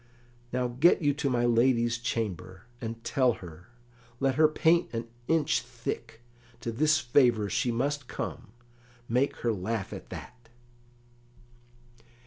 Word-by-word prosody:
Now 125 0 0
get 135 +8 +3
you 145 -1 +3
to 145 0 -1
my 120 -1 +1
lady's 120 0 +3
chamber, 105 -6 -3 0.2
and 115 0 -5
tell 125 0 +2
her, 85 -2 -11 0.5
let 135 -1 +2
her 155 +3 +5
paint 160 +2 +2
an 115 +1 -3 0.2
inch 160 -2 +2
thick, 115 - -6 0.4
to 115 - -3
this 155 +7 +3
favour 120 - +3
she 120 - +1
must 140 +3 -1
come; - - -5 0.6
make 125 +4 +1
her 115 - +3
laugh 105 +1 -3
at - - -9
that." 120 -2 -10
120 Hz, 130 wpm, -29 LUFS, 115-140 Hz, 0.6 s, her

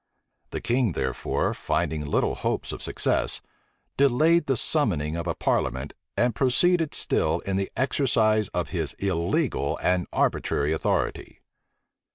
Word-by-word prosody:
The - - -5
king, 120 -4 +1
therefore 65 -3 -1
finding 75 -1 -1
little 75 - 0
hopes - - -2
of - - -7
success, - - +1 0.6
delayed 150 +5 +3
the 135 -2 +1
summoning 85 - +1
of 85 +1 -4
a 85 - -1
parliament, 65 +3 -1 0.2
and 120 0 +2
proceeded 160 - +2
still 80 +1 +1
in 95 - -3
the 95 0 -2
exercise 110 -6 +2
of 90 -2 -3
his 80 -6 -2
illegal 95 - -1
and 90 -1 +1
arbitrary 75 +2 0
authority. 80 - -2
100 Hz, 130 wpm, -25 LUFS, 80-130 Hz, 0.6 s, delayed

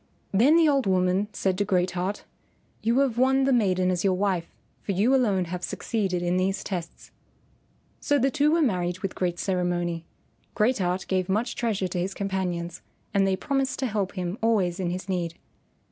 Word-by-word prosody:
Then 245 +11 +5
the 330 -2 +5
old 275 -6 +2
woman 185 +2 +2
said 190 -2 -1
to - - +3
Great 185 -2 +1
Heart, 185 +3 -3 0.6
"You 230 +3 +1
have 250 -4 0
won 265 +1 +4
the 270 0 +3
maiden 185 -5 +2
as 175 -1 -1
your 190 -2 +3
wife, 185 -3 0 0.3
for 200 - -2
you 210 +8 +3
alone 205 -9 +2
have 180 +1 -5
succeeded 190 -6 -2
in 175 +1 +1
these 190 +1 0
tests." 175 -4 -6 0.9
So 290 - +2
the 270 0 +2
two 300 +1 +2
were 330 0 +3
married 180 -7 0
with 195 - -3
great 175 -2 -1
ceremony. 175 -2 -1 0.5
Great 230 +2 +2
Heart 180 0 -1
gave 185 -1 0
much 220 +5 0
treasure 210 -5 -1
to 180 0 -3
his 190 +2 -2
companions, 180 -3 -3 0.3
and 195 -1 +3
they 190 - +2
promised 270 +4 -1
to 265 - -1
help 205 -5 -1
him 185 +2 -4
always 200 -6 +1
in 180 -2 -1
his 180 +3 -4
need. 175 -3 -2
190 Hz, 190 wpm, -26 LUFS, 180-230 Hz, 0.9 s, Then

